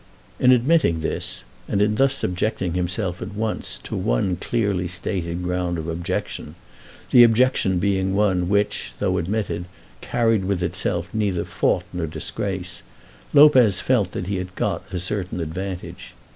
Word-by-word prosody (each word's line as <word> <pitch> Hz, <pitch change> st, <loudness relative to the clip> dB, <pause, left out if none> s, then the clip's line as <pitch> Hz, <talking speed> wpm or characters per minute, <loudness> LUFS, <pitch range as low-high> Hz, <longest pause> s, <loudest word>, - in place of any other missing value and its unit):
In 125 Hz, -, +6 dB
admitting 125 Hz, -, +3 dB
this, 80 Hz, -, -2 dB, 0.2 s
and 100 Hz, -, 0 dB
in 105 Hz, +1 st, +3 dB
thus 135 Hz, +4 st, +3 dB
subjecting 90 Hz, -1 st, -1 dB
himself 90 Hz, +1 st, -2 dB
at 100 Hz, +3 st, -6 dB
once 110 Hz, 0 st, -2 dB
to -, -, -5 dB
one -, -, 0 dB
clearly 100 Hz, -2 st, -1 dB
stated 90 Hz, -1 st, -3 dB
ground 90 Hz, -1 st, -1 dB
of 80 Hz, 0 st, -5 dB
objection, 85 Hz, +3 st, -4 dB, 0.6 s
the 125 Hz, -, +8 dB
objection 115 Hz, -5 st, +3 dB
being 95 Hz, 0 st, +1 dB
one 95 Hz, -4 st, +2 dB
which, 100 Hz, -11 st, 0 dB
though 95 Hz, +6 st, 0 dB
admitted, 90 Hz, -1 st, -2 dB, 0.4 s
carried 115 Hz, -4 st, +1 dB
with 95 Hz, -2 st, -1 dB
itself 85 Hz, 0 st, -1 dB
neither 100 Hz, -5 st, 0 dB
fault -, -, 0 dB
nor 85 Hz, -2 st, -2 dB
disgrace, 90 Hz, +3 st, -4 dB, 0.5 s
Lopez 130 Hz, -9 st, +6 dB
felt 115 Hz, -8 st, +2 dB
that -, -, -3 dB
he 100 Hz, +1 st, -2 dB
had 90 Hz, 0 st, -6 dB
got -, -, -2 dB
a 90 Hz, -, -3 dB
certain 95 Hz, 0 st, -3 dB
advantage. 90 Hz, +3 st, -6 dB
95 Hz, 145 wpm, -23 LUFS, 90-105 Hz, 0.6 s, the